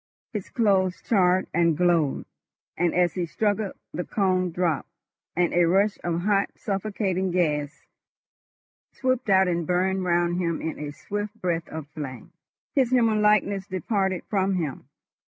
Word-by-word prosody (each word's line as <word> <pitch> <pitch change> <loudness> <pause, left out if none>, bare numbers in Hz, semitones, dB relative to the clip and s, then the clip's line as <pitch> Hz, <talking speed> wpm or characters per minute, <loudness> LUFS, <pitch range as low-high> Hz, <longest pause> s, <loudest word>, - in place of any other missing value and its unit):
His 210 -4 -4
clothes 195 -6 +2
charred 185 -3 +3
and 170 -2 +3
glowed, 170 -5 +2 0.5
and 175 0 +1
as 180 -1 +3
he 180 -2 -2
struggled 205 +2 -1 0.2
the 180 - -2
cone 185 -3 +1
dropped, 170 -3 -1 0.5
and 175 0 +1
a 175 0 +4
rush 195 +4 +2
of 170 -1 -1
hot 200 +1 +2
suffocating 195 -2 -2
gas 150 -5 -1 1.2
whooped 255 -3 +1
out 190 -1 +5
and 170 -2 -1
burned 185 +1 +1
round 175 0 +1
him 170 -2 -1
in 160 - -4
a 150 -1 -4
swift 205 +7 -5
breath 170 -2 -1
of 160 -2 -7
flame. 140 -5 -7 0.4
His 265 -5 +3
human 230 -4 +3
likeness 205 -2 +2
departed 190 0 -1
from 195 -2 +1
him. 145 -6 -4
185 Hz, 145 wpm, -25 LUFS, 170-200 Hz, 1.2 s, out